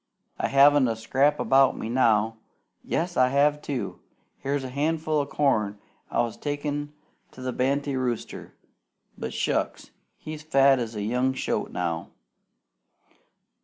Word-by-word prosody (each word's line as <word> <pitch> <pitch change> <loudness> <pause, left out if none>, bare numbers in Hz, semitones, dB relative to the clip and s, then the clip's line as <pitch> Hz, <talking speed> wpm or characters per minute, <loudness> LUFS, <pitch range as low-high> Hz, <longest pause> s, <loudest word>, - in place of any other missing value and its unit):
I - - +1
haven't 140 -1 +5
a 115 - -1
scrap 135 +6 +1
about 135 0 +4
me - - -4
now. 115 -2 +2 0.5
Yes, 175 +1 -2
I 130 - +5
have, 145 +2 +2
too! 125 -10 -4 0.4
Here's 140 0 -2
a 130 - -5
handful 155 +3 0
o' 140 - -1
corn 110 -9 +1 0.3
I - - +1
was 115 -2 -5
takin' 145 0 -3 0.4
to 130 - -12
the 130 -1 -2
banty 140 +2 0
rooster; 125 -3 -4 0.6
but - - -5
shucks! - - -2 0.3
he's 155 -1 -8
fat 135 -3 +4
as 115 -2 -4
a 105 - -3
young 125 +4 +1
shoat - - -2
now. 85 -2 -3
135 Hz, 140 wpm, -26 LUFS, 120-145 Hz, 0.6 s, haven't